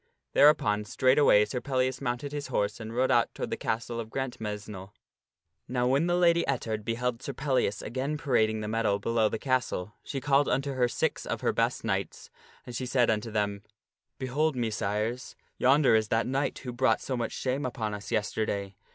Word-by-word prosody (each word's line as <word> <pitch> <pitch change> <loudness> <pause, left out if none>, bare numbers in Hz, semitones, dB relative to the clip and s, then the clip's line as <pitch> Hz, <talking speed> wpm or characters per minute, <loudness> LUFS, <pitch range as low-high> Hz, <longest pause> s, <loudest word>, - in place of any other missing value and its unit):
Thereupon 105 -8 +4
straightway 130 -2 +4
Sir 125 +3 -4
Pellias 130 -1 -1
mounted 125 +2 -2
his 145 -1 -4
horse 105 +2 -1
and 110 0 -7
rode 130 +2 +2
out 120 -2 +3
toward - - -4
the - - 0
castle 115 +1 -3
of 110 -1 -5
Grantmesnle. 105 -6 -5 0.7
Now 125 -1 0
when 140 +6 +2
the 175 - +2
Lady 170 -1 +4
Ettard 115 -5 -2
beheld 120 +2 -2
Sir 140 - -5
Pellias 130 -8 0
again 130 +6 -2
parading 110 -7 +1
the 105 - -4
meadow 110 -2 +1
below 110 +1 +1
the 110 - -3
castle, 120 -7 -1
she 135 - -4
called 140 +1 +2
unto 135 +2 0
her 125 -2 +2
six - - -2
of - - -3
her - - +1
best - - 0
knights, - - -3 0.3
and 120 - -8
she 130 +2 -3
said 125 -2 +3
unto 110 +1 -2
them, 105 -2 -1 0.3
" - - -65
Behold, 145 +4 0
Messires, 110 +1 -2 0.2
yonder 135 0 +5
is 110 -1 +3
that 115 +2 +1
knight 135 +2 -1
who 125 -2 -6
brought 130 +2 +2
so 130 - -3
much 120 -1 -2
shame 130 +2 -2
upon 110 -4 -3
us 105 +1 -7
yesterday. 105 -3 -1
120 Hz, 185 wpm, -28 LUFS, 110-135 Hz, 0.7 s, yonder